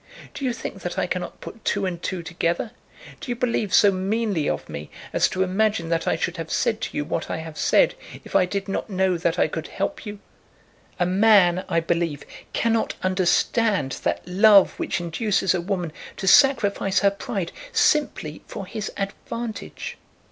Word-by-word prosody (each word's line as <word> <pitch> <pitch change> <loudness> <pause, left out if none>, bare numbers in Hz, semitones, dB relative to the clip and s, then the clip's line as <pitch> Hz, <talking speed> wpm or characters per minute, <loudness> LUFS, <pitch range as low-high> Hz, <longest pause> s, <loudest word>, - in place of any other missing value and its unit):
Do - - -7
you 255 - +1
think 200 -4 -6
that 175 +2 -4
I 190 - +1
cannot 180 0 -4
put 230 - -10
two 200 -1 0
and 175 -2 -3
two 180 -2 -3
together? 170 +4 -1 0.5
Do - - -8
you 240 - 0
believe 230 -5 -1
so 205 +1 +6
meanly 195 -3 0
of - - -3
me 75 +1 -7 0.2
as - - +3
to 185 - 0
imagine 190 -2 0
that 165 -1 0
I - - +3
should 175 +2 -2
have 165 -1 -5
said 220 - 0
to - - -4
you 145 - -1
what 160 - -3
I - - -2
have 160 -1 -7
said, - - +3 0.3
if - - -10
I 185 - +5
did 200 +1 -3
not 195 - -3
know 190 -1 +1
that 170 -1 0
I - - +3
could 160 0 -5
help - - -3
you? 205 0 -6 0.8
A 175 - +3
man, 185 -2 +4
I 165 - +2
believe, 165 -3 -1 0.3
cannot 230 -1 0
understand 185 - +1
that - - -2
love 200 +2 +6
which - - -1
induces 190 +2 0
a 180 - 0
woman 175 -3 -3 0.2
to - - -4
sacrifice 205 -6 +4
her 200 -1 +4
pride 200 -4 -4 0.2
simply 300 - +1
for 195 - -6
his 215 +2 -5
advantage. 215 +3 -5
190 Hz, 185 wpm, -24 LUFS, 170-215 Hz, 0.8 s, so